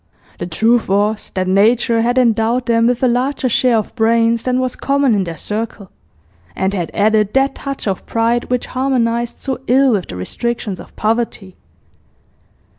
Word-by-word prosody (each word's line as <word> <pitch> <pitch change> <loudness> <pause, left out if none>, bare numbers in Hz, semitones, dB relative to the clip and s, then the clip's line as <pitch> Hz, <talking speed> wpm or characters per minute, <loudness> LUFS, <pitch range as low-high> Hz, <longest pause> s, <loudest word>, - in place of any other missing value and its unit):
The - - -4
truth 225 +7 +2
was 205 +2 0
that 185 -1 -1
nature 225 +4 +3
had 240 +2 0
endowed 235 0 +2
them 230 -1 +2
with 245 +1 0
a - - +5
larger 255 +2 0
share 245 0 +2
of 215 - -3
brains 230 0 +2
than 255 +1 0
was 255 -1 -2
common 280 -3 +1
in 200 -3 +1
their 165 -2 -6
circle, 210 -1 -5 0.6
and 190 +1 -1
had 175 -4 -2
added 215 0 +2
that 270 0 +3
touch 275 -5 -6
of 190 -2 -3
pride 230 +1 0
which 250 -1 -2
harmonised 240 -3 -1
so 265 -2 -2
ill 265 +1 +4
with 200 -5 -1
the - - -7
restrictions 210 - -4
of - - -13
poverty. 215 -4 -2
230 Hz, 170 wpm, -17 LUFS, 210-250 Hz, 0.6 s, a